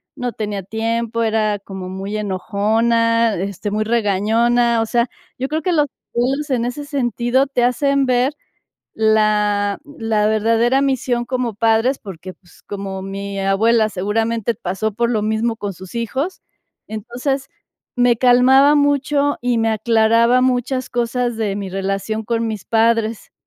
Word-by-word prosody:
no 245 -1 -3
tenía 205 -2 -4
tiempo, 230 +3 -2
era 215 -2 +1
como 190 -2 -8
muy 195 +3 -5
enojona, 225 +3 +1
este, 195 +2 -4
muy 215 +1 0
regañona. 230 +2 +2
O - - 0
sea, 235 +1 0 0.3
yo 265 - -1
creo 315 +1 -1
que 360 0 0
los 295 -2 +2 0.3
abuelos 270 +5 0
en 240 -2 +1
ese 285 +4 -4
sentido 260 -1 0
te 250 -3 0
hacen 275 +2 +1
ver 255 +2 +1 0.6
la 210 -2 +2 0.2
la 220 -2 +1
verdadera 230 +4 +2
misión 255 -3 0
como 245 -3 -2
padres, 225 +5 +2
porque, 185 -2 -9
pues, 175 - -23
como 195 -1 -6
mi 195 0 -5
abuela 215 +3 +2
seguramente 225 +3 -1
pasó 200 +1 -3
por 235 +3 0
lo 215 -3 0
mismo 220 +2 0
con 205 -2 -4
sus 185 +3 -12
hijos, 265 +10 -3 0.4
entonces, 245 +6 -3 0.5
me 245 -1 +3
calmaba 260 +4 +5
mucho, 285 0 +1
y 245 -1 +1
me 225 0 +1
aclaraba 230 +2 +3
muchas 255 0 0
cosas 240 0 -1
de 210 -3 -2
mi 200 -2 -4
relación 195 +3 -2
con 230 0 -1
mis 215 -4 -5
padres. 225 -1 +1
230 Hz, 145 wpm, -19 LUFS, 210-245 Hz, 0.6 s, calmaba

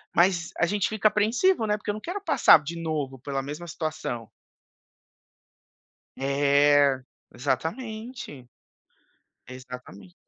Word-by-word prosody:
Mas 175 -1 +3
a - - +4
gente 205 +1 0
fica 215 0 +2
apreensivo, 225 - +2
né, 210 - +2
porque 210 - -8
eu - - -4
não - - -6
quero 370 - -5
passar 160 - +6
de 165 +3 -6
novo 150 -5 -3
pela 135 +1 -3
mesma 150 +5 -7
situação. 155 -8 -4 1.9
É. 140 0 +3 0.3
Exatamente. 210 - -4 1.0
Exatamente. 125 -8 -11
155 Hz, 110 wpm, -26 LUFS, 135-210 Hz, 1.9 s, passar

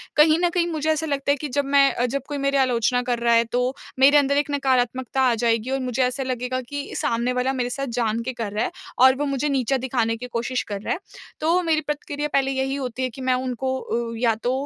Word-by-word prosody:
कहीं 310 +2 +5
न 350 0 +2
कहीं 345 -1 0
मुझे 315 0 -1
ऐसा 315 +1 -1
लगता 280 -1 0
है - - +3
कि 300 - -4
जब 280 +2 0
मैं 275 -3 +3
जब 275 +2 -2
कोई 290 - -4
मेरी 275 0 +1
आलोचना 245 -2 +2
कर 245 -1 -1
रहा 235 0 +3
है 230 0 +5
तो 250 +1 +1 0.3
मेरे 280 +2 +7
अंदर 280 0 +3
एक 290 0 0
नकारात्मकता 260 -1 0
आ 250 -2 +4
जाएगी 230 +1 0
और 270 - 0
मुझे 255 0 0
ऐसा 250 +2 -1
लगेगा 255 0 -2
कि 285 0 -5
सामने 235 +2 0
वाला 255 +2 0
मेरे 245 -2 -1
साथ 275 +2 -3
जान 225 -1 0
के 255 +2 -3
कर 230 -4 -4
रहा 215 - 0
है - - -3 0.3
और 260 +1 +7
वो 290 - -2
मुझे 275 +1 -1
नीचा 270 -1 +1
दिखाने 235 -3 0
की 250 +2 -7
कोशिश 240 +2 -1
कर 200 -1 -6
रहा - - -1
है। - - -5 0.4
तो 335 +4 +2
मेरी 315 -2 +1
प्रतिक्रिया 295 0 -3
पहले 270 -1 +2
यही 265 0 -1
होती 260 -2 -4
है 255 - 0
कि 260 +3 -11
मैं 255 0 +2
उनको 260 +1 -2
उ 230 -1 -3
या 230 -1 +2
तो 245 - +1
260 Hz, 250 wpm, -23 LUFS, 245-280 Hz, 0.4 s, मेरे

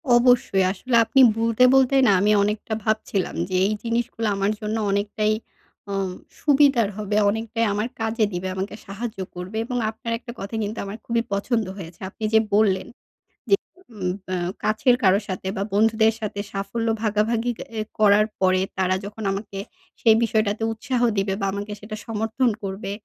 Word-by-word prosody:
অবশ্যই। 240 -5 +4
আসলে 235 +5 -2
আপনি 245 +5 +2 0.2
বলতে, 230 +1 +2
বলতে 265 0 +4
না - - +6
আমি 210 - +3
অনেকটা 210 +2 -2
ভাবছিলাম 215 -3 -1
যে 185 - -2
এই 210 - +1
জিনিসগুলা 230 -1 -1
আমার 195 +1 +1
জন্য 215 +1 -2
অনেকটাই 210 +2 0 0.6
আ - - -2 0.5
সুবিধার 275 -6 +4
হবে, 210 -1 -2
অনেকটাই 225 +2 -1
আমার 210 +3 -1
কাজে 225 0 +1
দিবে, 180 +1 -3
আমাকে 195 +2 -4
সাহায্য 215 +2 -6 0.2
করবে 185 +5 -6
এবং 245 +1 -3
আপনার 225 +1 -6
একটা 240 - -9
কথা 200 +3 -5
কিন্তু 210 +2 -4
আমার 200 +3 -6
খুবই 230 0 +1
পছন্দ 220 +2 0
হয়েছে। 170 -3 -9
আপনি 215 - -11
যে 220 - +7
বললেন 200 -3 +3 0.9
যে - - -23
উম 185 -4 -2 0.2
অ্যা 185 - -1 0.3
কাছের 230 +3 +3
কারো 190 0 +5
সাথে 190 0 -4
বা 195 - 0
বন্ধুদের 220 +1 +4
সাথে 210 -2 -4
সাফল্য 200 +4 -3 0.2
ভাগাভাগি 225 +3 +1 0.3
এ - - +1 0.2
করার 210 0 +5 0.2
পরে 185 0 +3 0.2
তারা 185 0 +2
যখন 210 +2 -7
আমাকে 195 0 -5 0.4
সেই 225 -2 +6
বিষয়টাতে 215 -1 0
উৎসাহ 240 +3 -2 0.2
দিবে 195 0 +1
বা 195 - +1
আমাকে 205 +1 -5
সেটা 215 +1 -7
সমর্থন 225 +3 0
করবে, 195 +1 -4
215 Hz, 165 wpm, -23 LUFS, 195-230 Hz, 0.9 s, যে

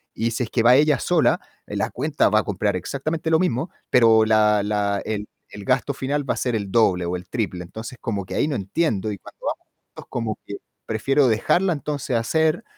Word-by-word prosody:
Y 115 +1 0
si 115 +2 -1
es 110 - -9
que 115 - +1
va 125 +2 +7
ella 150 0 +4
sola, 175 -3 +2 0.3
en - - -5
la - - -1
cuenta 145 +3 +1
va 110 - +3
a - - -3
comprar 100 0 -1
exactamente 155 - -3
lo 160 - +5
mismo, 165 -2 0 0.2
pero 115 -2 +6
la 105 -1 +3
la 100 -1 0
el 105 -1 -3 0.2
el 100 -1 -10
gasto 140 - +1
final 140 +1 -2
va - - +2
a - - -9
ser 125 -2 -1
el 100 -3 -4
doble 95 -5 +3
o 85 +1 -2
el 90 0 -10
triple. 100 -6 -3
Entonces, 110 +7 -9
como 100 -4 -3
que - - -7
ahí - - +1
no 145 - -1
entiendo, 110 - -1
y 100 - -6
cuando - - -15
vamos - - -3 0.2
juntos, - - -13
como 115 -3 -3
que 100 - -5 0.3
prefiero 135 +5 +2
dejarla 175 - +2
entonces 145 -4 -2
hacer 160 - +1
115 Hz, 220 wpm, -23 LUFS, 105-145 Hz, 0.3 s, va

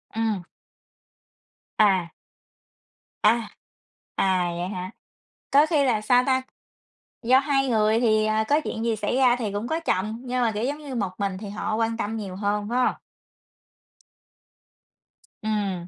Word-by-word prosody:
Ừm. 220 -4 -1 1.3
À. 190 -6 +3 1.1
À, 225 +1 +3 0.7
à, 185 -2 +1
vậy 175 +1 -2
hả? 185 -1 -5 0.6
Có 285 +2 +6
khi 305 -4 +2
là 235 -5 +2
sao 245 +3 +4
ta? 260 -1 +2 0.8
Do 255 +3 +5
hai 270 -1 +1
người 220 -1 +2
thì, 215 -2 +3
ờ, 215 0 +1
có 295 +2 +3
chuyện 225 -4 -4
gì 230 -1 +1
xảy 210 +2 -2
ra 255 -2 +4
thì 225 -5 -3
cũng 205 +3 -3
có 320 +4 -1
chồng, 215 - -2
nhưng 250 0 -1
mà, 235 -2 +2
kiểu, 210 +1 -3
giống 280 +4 -1
như 285 -4 -7
một 200 -6 -1
mình 195 -2 -2
thì 205 0 -7
họ 215 +1 -3
quan 225 0 0
tâm 225 0 -3
nhiều 195 -4 -6
hơn, 205 +1 -1
phải 245 +2 0
hông? - - +1 2.5
Ừm. 200 -5 -2
220 Hz, 155 wpm, -25 LUFS, 205-250 Hz, 2.5 s, Có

